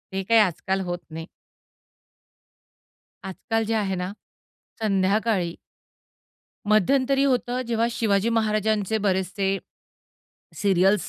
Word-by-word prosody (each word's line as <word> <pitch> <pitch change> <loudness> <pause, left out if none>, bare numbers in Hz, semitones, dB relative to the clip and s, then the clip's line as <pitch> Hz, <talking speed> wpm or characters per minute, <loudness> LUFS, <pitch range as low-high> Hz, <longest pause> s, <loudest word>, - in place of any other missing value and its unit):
हे 195 0 -2
काही 225 +4 +4
आजकाल 190 0 0
होत 175 0 -3
नाही. 160 +1 -6 2.0
आजकाल 210 +4 -2
जे 225 - -1
आहे 200 -3 0
ना, 180 +1 -3 0.7
संध्याकाळी 195 -2 +1 1.1
मध्यंतरी 270 +6 +3
होतं, 250 -1 0
जेव्हा 230 0 +1
शिवाजी 215 -2 +1
महाराजांचे 215 -2 +1
बरेचसे 190 +1 0 1.0
सीरियल्स 195 0 +2
205 Hz, 90 wpm, -24 LUFS, 190-225 Hz, 2.0 s, काही